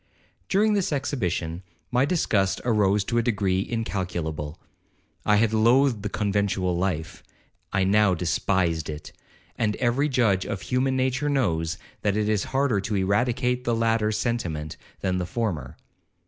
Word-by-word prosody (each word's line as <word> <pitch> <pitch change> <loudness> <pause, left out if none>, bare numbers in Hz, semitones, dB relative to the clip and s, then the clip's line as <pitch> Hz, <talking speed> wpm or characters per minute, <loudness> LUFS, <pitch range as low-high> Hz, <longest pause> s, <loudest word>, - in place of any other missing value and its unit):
'During 210 +2 +3
this 200 -5 0
exhibition, 90 - -2 0.3
my 125 +2 +3
disgust 105 - +1
arose 105 -3 +3
to 120 +4 0
a - - +3
degree 100 -5 +1
incalculable. 85 -9 -3 0.7
I 105 - +5
had 110 +1 +2
loathed 120 +1 +4
the 105 - -3
conventual 100 -3 0
life—I 90 +1 -4
now 100 0 +4
despised 85 -1 0
it; 75 0 -7 0.5
and 105 -2 +1
every 130 +5 +1
judge 110 -8 +2
of 95 - -4
human 130 +4 0
nature 130 +3 0
knows, 85 - 0 0.2
that 105 0 +1
it 105 -1 +1
is 105 -2 +1
harder 135 -6 +1
to 105 +2 -2
eradicate 120 +6 +1
the 120 -1 +1
latter 115 -1 +1
sentiment 90 -10 -2 0.3
than 90 -1 0
the 90 - -3
former. 110 - -3
105 Hz, 140 wpm, -25 LUFS, 95-120 Hz, 0.7 s, I